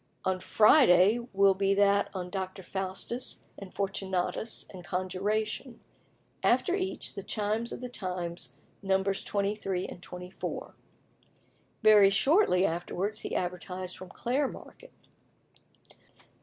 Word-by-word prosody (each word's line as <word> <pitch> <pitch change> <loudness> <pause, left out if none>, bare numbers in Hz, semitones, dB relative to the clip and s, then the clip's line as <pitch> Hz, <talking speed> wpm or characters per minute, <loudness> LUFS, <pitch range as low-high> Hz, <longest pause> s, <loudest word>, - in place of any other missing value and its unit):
"On 190 0 +1
Friday 210 - +5
will 195 0 +5
be 195 +1 +1
that 200 0 +3
on 180 -1 -4
Dr. 190 0 -4
Faustus 190 +7 -3 0.2
and 195 -2 -9
Fortunatus 190 +2 -2
and 185 -2 -10
conjuration. 210 +7 -2 0.6
After 360 - +2
each 380 0 -2
the 200 - -6
Chimes 215 +3 -1
of - - -6
the 250 - -4
Times, 175 - -5 0.2
Nos. 195 0 0
23 200 -2 -1
and 175 - -9
24." 180 +1 -7 1.1
Very 210 -2 +8
shortly 200 - +3
afterwards 190 +4 -2
he - - -4
advertised 180 +1 -3
from 185 - -10
Clare 265 +4 0
Market: - - -12 1.0
1. - - -24
195 Hz, 115 wpm, -29 LUFS, 185-215 Hz, 1.1 s, Very